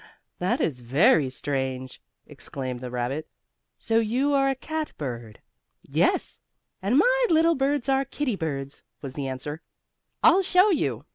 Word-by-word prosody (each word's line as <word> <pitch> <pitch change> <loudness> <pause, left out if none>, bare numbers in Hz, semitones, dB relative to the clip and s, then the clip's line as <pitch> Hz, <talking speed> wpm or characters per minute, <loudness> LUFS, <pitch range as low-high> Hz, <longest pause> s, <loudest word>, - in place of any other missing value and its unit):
That 180 +1 0
is 140 -6 -1
very 135 - +3
strange!" 130 -1 -3 0.2
exclaimed 130 -2 -5
the 125 0 -6
rabbit. 125 +5 -3 0.5
"So 225 0 +1
you 250 +6 +1
are 275 -1 +3
a 270 - 0
cat 315 +3 -4
bird." 120 -6 -6 0.4
"Yes, - - 0 0.4
and 205 +7 +2
my - - +4
little 330 +1 +4
birds 275 -2 0
are 270 0 +2
kittie 275 -4 -2
birds," 140 -5 -4 0.2
was 135 -2 -6
the 140 -1 -4
answer. 140 +4 -5 0.6
"I'll 345 +4 +6
show 370 +2 +4
you." 140 - -1
160 Hz, 145 wpm, -25 LUFS, -, 0.6 s, I'll